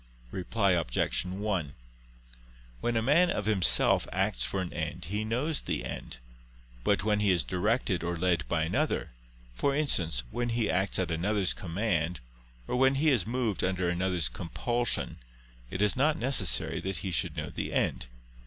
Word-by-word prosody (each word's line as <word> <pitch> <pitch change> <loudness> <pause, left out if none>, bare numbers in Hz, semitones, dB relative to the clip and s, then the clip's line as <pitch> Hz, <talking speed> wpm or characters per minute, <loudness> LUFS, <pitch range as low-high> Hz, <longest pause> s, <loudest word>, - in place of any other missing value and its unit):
Reply 100 +2 0
Obj. 85 -1 +1
1: 95 -6 -2 1.1
When 120 - 0
a 110 - +1
man 160 +8 +4
of 105 - -1
himself 105 -4 +3
acts - - +1
for 65 +9 -1
an 90 -2 -4
end, 85 0 -4
he 105 +6 -2
knows 130 +8 -1
the - - -3
end: - - -6 0.7
but 100 +4 +2
when 105 -1 +2
he 105 -1 +2
is 90 -3 +3
directed 95 0 0
or 85 0 -2
led 85 -2 0
by 80 -1 +1
another, 80 - -1 0.4
for 140 - 0
instance, 85 - +1
when 120 0 -2
he 115 -4 +1
acts 95 +3 +1
at 90 -2 -1
another's 95 +4 +1
command, 85 -2 -1 0.5
or - - -1
when 135 +1 +4
he 155 +3 +3
is 110 -7 +1
moved 115 -6 -1
under 90 -1 0
another's 90 -1 0
compulsion, 120 +8 -1 0.5
it 95 +8 0
is 105 - +3
not 150 +4 +2
necessary 120 -7 +2
that 95 -1 -3
he 95 - -2
should 85 - -1
know - - -4
the - - -4
end. - - 0
95 Hz, 165 wpm, -29 LUFS, 85-115 Hz, 1.1 s, man